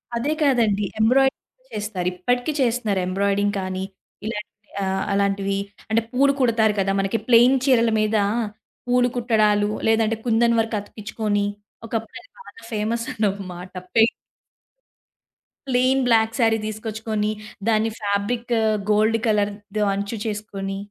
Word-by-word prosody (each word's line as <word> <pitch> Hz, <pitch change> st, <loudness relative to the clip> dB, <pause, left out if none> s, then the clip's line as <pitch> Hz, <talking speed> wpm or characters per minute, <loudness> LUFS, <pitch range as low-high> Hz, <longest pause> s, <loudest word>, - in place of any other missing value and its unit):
అదే 270 Hz, +6 st, 0 dB
కాదండి. 225 Hz, -7 st, +2 dB
ఎంబ్రాయిడరింగ్ 270 Hz, -, +1 dB
చేస్తారు. 205 Hz, -4 st, -3 dB
ఇప్పటికి 245 Hz, -, -1 dB
చేస్తున్నారు. 230 Hz, -5 st, +1 dB
ఎంబ్రాయిడరింగ్ 200 Hz, +2 st, 0 dB
కానీ 185 Hz, 0 st, -3 dB, 0.4 s
ఇలాంటి 215 Hz, -1 st, -5 dB, 0.3 s
ఆహ్, 190 Hz, 0 st, -1 dB
అలాంటివి. 200 Hz, 0 st, 0 dB, 0.3 s
అంటే 225 Hz, +1 st, +2 dB
పూలు 275 Hz, +2 st, +3 dB
కుడతారు 225 Hz, -3 st, +3 dB
కదా! 195 Hz, 0 st, +1 dB
మనకి 195 Hz, +3 st, 0 dB
ప్లెయిన్ 245 Hz, +2 st, +6 dB
చీరల 235 Hz, -4 st, +4 dB
మీద 215 Hz, +1 st, +2 dB, 0.7 s
పూలు 245 Hz, 0 st, +3 dB
కుట్టడాలు 215 Hz, -4 st, +2 dB, 0.2 s
లేదంటే 225 Hz, 0 st, +3 dB
కుందన్ 235 Hz, 0 st, +3 dB
వర్క్ 225 Hz, 0 st, 0 dB
అతికిచ్చుకొని 210 Hz, 0 st, -2 dB, 0.4 s
ఒకప్పుడు 225 Hz, 0 st, -4 dB
అది -, -, -22 dB
బాగా 475 Hz, -, -14 dB
ఫేమసన్నమాట. 205 Hz, -5 st, -2 dB, 0.2 s
పైయింట్ 225 Hz, 0 st, +5 dB, 1.6 s
ప్లెయిన్ 260 Hz, +1 st, +2 dB
బ్లాక్ 225 Hz, -1 st, +3 dB
శారీ 225 Hz, -2 st, +4 dB
దీసుకొచ్చుకొని 215 Hz, 0 st, -3 dB, 0.4 s
దాన్ని 220 Hz, 0 st, +2 dB
ఫాబ్రిక్ 210 Hz, +4 st, -1 dB, 0.4 s
గోల్డ్ 215 Hz, +2 st, +3 dB
కలర్ 205 Hz, -1 st, +2 dB, 0.3 s
ద 210 Hz, -1 st, +2 dB
అంచు 200 Hz, +3 st, -3 dB
చేసుకొని 205 Hz, -2 st, -4 dB
220 Hz, 120 wpm, -22 LUFS, 205-235 Hz, 1.6 s, ప్లెయిన్